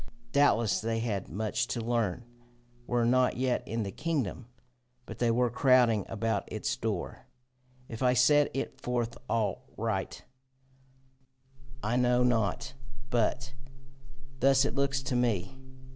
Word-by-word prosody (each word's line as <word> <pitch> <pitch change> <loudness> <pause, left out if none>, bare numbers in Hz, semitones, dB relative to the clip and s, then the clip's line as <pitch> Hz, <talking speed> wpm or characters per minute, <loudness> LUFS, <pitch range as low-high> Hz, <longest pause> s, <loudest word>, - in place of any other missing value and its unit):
Doubtless 120 -7 +3
they 115 0 -1
had 105 -5 -3
much 110 +5 -2
to 120 - -3
learn, 115 -1 -1 0.6
were 120 -1 +1
not 125 +1 +3
yet 125 -1 0
in 115 0 -2
the 100 - -4
kingdom, 130 - -3 0.6
but - - -9
they 120 - +2
were 120 +1 +2
crowding 125 -5 +4
about 115 -2 -2
its - - -2
door. - - -4 0.6
If 115 - -8
I 125 -1 +3
set 145 +4 +5
it 135 - -4
forth 120 -1 -2
aright, 115 -2 -2 1.6
I 115 +4 0
know 125 0 +3
not, 115 -1 0 0.4
but 130 +3 0 0.9
thus 135 0 +4
it - - -1
looks 135 -1 0
to 130 - -2
me. 120 -1 0
120 Hz, 130 wpm, -29 LUFS, 115-130 Hz, 1.6 s, set